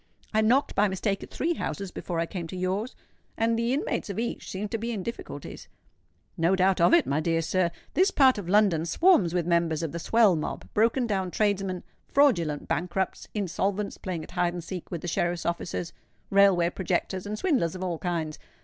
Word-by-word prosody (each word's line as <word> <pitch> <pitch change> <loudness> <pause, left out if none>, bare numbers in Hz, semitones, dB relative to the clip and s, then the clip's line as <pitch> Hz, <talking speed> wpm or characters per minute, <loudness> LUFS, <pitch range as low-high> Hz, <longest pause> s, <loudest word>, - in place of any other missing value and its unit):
"I 220 - +3
knocked 245 +6 +3
by 210 - +3
mistake 195 +1 -1
at - - -9
three 340 +2 -1
houses 200 - -4
before 175 -1 -4
I 165 - +1
came 170 -1 -5
to 185 - -7
yours, 190 +7 -2 0.4
and 230 0 +2
the 235 +1 0
inmates 265 -4 -1
of 200 - -4
each 235 +1 -3
seemed 200 +2 -4
to 225 - -1
be 230 +2 -3
in 205 -5 -3
difficulties." 235 - -7 0.7
"No 170 +2 +2
doubt 190 -1 +2
of 170 - +5
it, 340 - +4
my 140 - 0
dear 165 +1 0
sir. 185 +1 +1 0.2
This 375 +3 +4
part 265 - +4
of 180 -4 -6
London 190 -5 +3
swarms 270 - +4
with 175 -2 +1
members 170 -2 +1
of 160 - -2
the 170 - -4
Swell 220 0 +4
Mob, 155 - -4
broken 230 +4 +2
down 190 -4 -1
tradesmen, 195 -2 0 0.2
fraudulent 175 - +2
bankrupts, 180 +2 -2
insolvents 200 +1 -2
playing 175 -4 -4
at - - -12
hide 175 -1 0
and 175 -1 -5
seek 180 0 -7
with 170 -3 -4
the - - -5
sheriff's 175 +1 -1
officers, 170 0 -3 0.4
railway 195 -3 +5
projectors, 190 +1 -2
and 210 +1 -3
swindlers 245 - +1
of 185 - -5
all 175 -3 -2
kinds. 165 -4 -3
190 Hz, 200 wpm, -27 LUFS, 170-215 Hz, 0.7 s, of